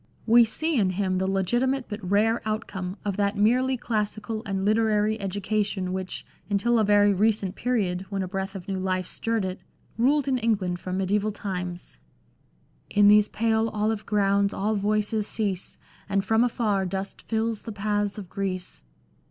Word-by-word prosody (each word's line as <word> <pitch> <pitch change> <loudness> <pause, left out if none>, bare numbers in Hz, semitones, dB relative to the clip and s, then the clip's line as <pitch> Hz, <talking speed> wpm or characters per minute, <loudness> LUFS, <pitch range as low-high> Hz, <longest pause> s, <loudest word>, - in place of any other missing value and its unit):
We 235 +1 +7
see 310 +5 0
in 195 -3 +3
him 185 0 0
the 190 - 0
legitimate 240 +8 +1
but 210 -1 -6
rare 220 +3 +3
outcome 205 -3 -4
of 200 -1 -2
that 200 0 0
merely 255 +5 +3
classical 215 -1 -2
and 195 -1 -1
literary 215 0 +2
education 200 -1 -1
which, 185 0 -4 0.2
until 225 +4 +2
a - - +3
very 205 0 +4
recent 200 -1 +1
period, 190 -7 -1
when 195 -2 -2
a - - -4
breath 195 +1 -4
of 185 -2 -8
new 195 -1 -2
life 185 -1 -1
stirred 225 +1 -2
it, 185 0 -4 0.4
ruled 280 +4 +3
in 260 -2 +1
England 200 -6 0
from 185 +1 -4
medieval 200 +2 +1
times. 180 -3 -6 0.4
" - - -38
In 205 0 +5
those 210 0 +6
pale 225 0 +1
olive 215 0 -1
grounds 200 -1 +2
all 210 +3 0
voices 210 +1 0
cease, 200 -5 -2 0.3
And 200 0 +1
from 220 +3 +3
afar 210 -5 0
dust 195 +2 -5
fills 225 -1 -1
the 225 - -7
paths 205 0 -1
of 200 -3 -7
Greece." 185 - -4
205 Hz, 170 wpm, -26 LUFS, 195-220 Hz, 0.4 s, We